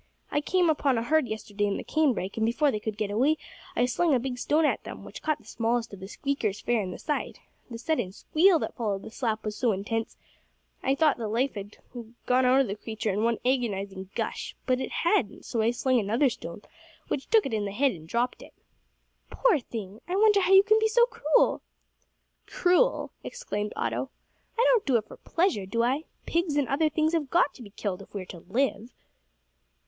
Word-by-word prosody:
I 290 - +1
came 360 +3 +2
upon 285 -5 +2
a 230 - 0
herd 310 +1 +2
yesterday 205 -2 -2
in 200 - -1
the - - -5
cane 310 -4 +2
brake, 190 +1 -4
and, 220 - -1
before 275 +6 +2
they 215 - -2
could 215 0 -4
get 210 -2 -2
away, 270 +9 +2 0.4
I 245 - +3
slung 295 +4 +2
a - - +2
big 250 0 -4
stone 305 +5 +2
at - - 0
them, - - -8
which - - -9
caught 310 -1 0
the - - -23
smallest 230 -1 -1
of 200 - -8
the 190 - -8
squeakers 220 -4 -2
fair 240 -2 +1
in 190 - -4
the 180 - -6
side. 300 - -3 0.3
The 230 - -6
sudden 240 - -1
squeal 335 - +3
that - - -4
followed 205 -5 -2
the - - -9
slap 220 -3 -2
was 210 -1 -3
so 240 -4 +1
intense, 225 +4 -3 0.6
that - - -2
I 270 - +4
thought 305 0 +3
the 225 - -2
life 245 +6 0
had 205 0 -8 0.5
gone 255 +1 +3
out 260 +2 +5
of - - +1
the 200 - -3
creature 220 0 -3
in 205 - -1
one 230 0 +2
agonising 200 -7 -1
gush; - - -3
but 255 0 +1
it - - -3
hadn't, 340 - 0
so 230 - -1
I 220 - +3
slung 250 +1 +2
another 230 +6 +2
stone, 170 -2 -8 0.4
which 270 - -3
took 445 -2 +5
it 265 - -3
in 210 -2 0
the 200 - -3
head 270 +6 +2
and 160 -5 -10
dropt 240 +7 -1
it." - - -14 0.7
"Poor 460 -11 +3
thing! 215 -4 -7
I 360 - -2
wonder 415 0 +5
how 370 - +1
you 385 0 +9
can 430 +1 +4
be 440 - +3
so 475 +2 +5
cruel." 310 -10 +2 0.9
"Cruel!" 365 +8 +2
exclaimed 210 - -4
Otto, - - -2 0.5
"I 475 - +4
don't 475 -4 +3
do 255 -3 +4
it 215 - -3
for - - -12
pleasure, 330 - 0
do 230 +4 0
I? 270 +6 0 0.2
Pigs 335 -3 0
and 290 -3 +2
other 305 +4 +2
things 310 +1 +1
have 310 -5 0
got 340 -2 +3
to - - -14
be 215 - -10
killed 200 -2 -4
if - - -15
we 195 - -3
are - - -10
to 175 - -10
live." 225 +4 -1
245 Hz, 225 wpm, -27 LUFS, 210-310 Hz, 0.9 s, you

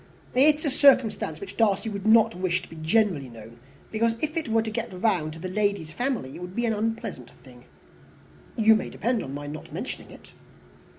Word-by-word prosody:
"It 290 +4 +6
is 305 - -8
a 290 - +1
circumstance 265 -5 +3
which 395 - -9
Darcy 210 -2 +2
of 215 - -3
course 200 - -4
could 215 +2 +3
not 225 -1 +5
wish 180 0 -1
to - - -11
be - - -12
generally 160 - +1
known, 115 0 -13 0.3
because 230 +1 +1
if 310 +3 -2
it 325 -4 -2
were 225 0 +2
to 220 - -4
get 215 - -4
round 180 -5 0
to - - -10
the 185 - -5
lady's 200 -4 -1
family 245 - -2
it - - -9
would 180 +1 -8
be 235 - 0
an 225 - +1
unpleasant 225 +2 -3
thing." - - -17 0.9
"You 220 -1 +6
may 215 - -1
depend 235 0 -1
upon 135 +1 -6
my 145 0 -6
not 150 +1 -8
mentioning - - -6
it." - - -15
215 Hz, 220 wpm, -26 LUFS, 175-230 Hz, 0.9 s, It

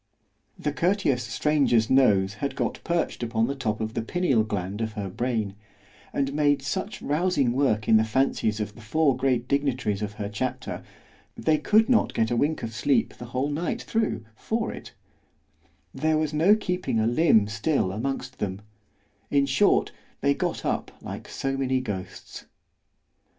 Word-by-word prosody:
The 150 - -2
courteous 165 -6 +1
stranger's 140 -7 +2
nose 105 -7 +4
had 140 - -2
got - - -2
perched 170 -6 -1
upon 115 -1 +1
the 135 - -2
top 110 -6 -2
of 110 0 -3
the - - -1
pineal 135 -3 +1
gland 100 -1 -3
of 110 -1 -2
her 100 -3 -4
brain, 115 -3 -1 0.6
and 140 0 -1
made 145 -2 +2
such 190 +9 -3
rousing 150 -5 +1
work 120 -5 +1
in 110 - +6
the 110 - +4
fancies 110 -2 0
of 105 -1 -3
the 115 - -14
four 140 +5 +2
great 125 -2 0
dignitaries 130 -7 0
of 105 -1 -3
her 105 -1 -4
chapter, 105 +5 -4 0.6
they 155 -1 +2
could 215 +8 +4
not 250 -3 +2
get 110 +1 +1
a - - +2
wink 150 +6 0
of 115 0 -4
sleep 135 +5 +1
the 120 - -9
whole 130 +4 -2
night 160 +4 -2
thro' 220 - -1
for 225 - -2
it——there 155 0 -6
was 155 -1 -1
no 170 +8 +5
keeping 180 - -1
a 110 - +2
limb 120 -3 +4
still 105 0 0
amongst 130 +4 -4
them——in 105 +7 -4
short, 140 +9 +3 0.3
they 140 0 +3
got - - -3
up - - -1
like - - -7
so 135 0 -2
many 130 -1 +1
ghosts. 105 -7 -7
130 Hz, 160 wpm, -26 LUFS, 110-150 Hz, 0.6 s, in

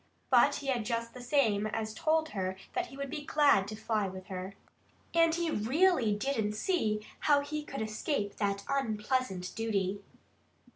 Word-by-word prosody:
But - - +6
he 285 - -6
had 255 -4 0
just 230 0 -2
the 250 - -9
same 230 -6 +2
as 220 0 -3
told 315 +6 +1
her 190 -5 -2 0.2
that 365 0 -1
he 270 - -12
would 280 -1 -4
be 295 - -4
glad 285 -10 +4
to 215 - -5
fly 215 -2 -1
with 185 0 -8
her. 190 +1 -5 0.6
And 330 -1 +4
he 340 -1 0
really 265 - +3
didn't 220 -2 -1
see 215 - 0
how 290 -1 +4
he 300 +1 -4
could 270 -5 -4
escape 215 -1 -2
that 200 -1 -1
unpleasant 220 -6 -1
duty. 205 -3 -1
225 Hz, 165 wpm, -31 LUFS, 205-285 Hz, 0.6 s, But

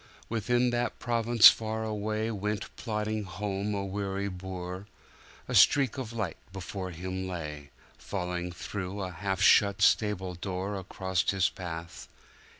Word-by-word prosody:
Within 120 +2 +1
that 120 0 -1
province 115 -1 +6
far 110 0 -2
away 110 +1 -2
Went 105 0 -3
plodding 110 -1 -2
home 100 +2 -3
a 100 -1 -2
weary 100 0 -2
boor;A 90 +1 -9
streak 135 -2 +5
of 120 -4 -5
light 110 -7 -3
before 95 0 -5
him 95 +2 -4
lay, 75 -5 -6 0.3
Falling 90 -2 -3
through 95 +2 -5
a 90 - -4
half 95 +2 -2
shut 100 0 +5
stable 100 -4 +2
doorAcross 95 0 -2
his 95 -1 +3
path. 85 -2 -7
100 Hz, 125 wpm, -29 LUFS, 90-110 Hz, 0.3 s, province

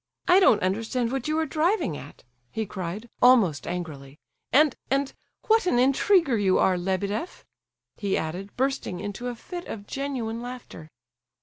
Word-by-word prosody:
"I 365 +1 +7
don't 300 - +5
understand 225 +5 -1
what 270 0 -2
you 310 +1 0
are 320 - +1
driving 315 - 0
at!" 145 0 -11 0.3
he 220 - -2
cried, 190 +3 -5
almost 230 - +5
angrily, 150 -6 -6 0.3
"and, 295 0 +5
and—what 280 - 0
an 245 - +3
intriguer 275 - +3
you 190 -2 +3
are, 185 - +3
Lebedeff!" 195 - -3 0.5
he 200 -2 0
added, 180 +6 -5
bursting 265 -8 -1
into 205 +6 -5
a 245 - -3
fit 350 +9 -8
of 205 -2 -7
genuine 245 -4 -3
laughter. 245 -10 -9
230 Hz, 145 wpm, -26 LUFS, 190-275 Hz, 0.5 s, I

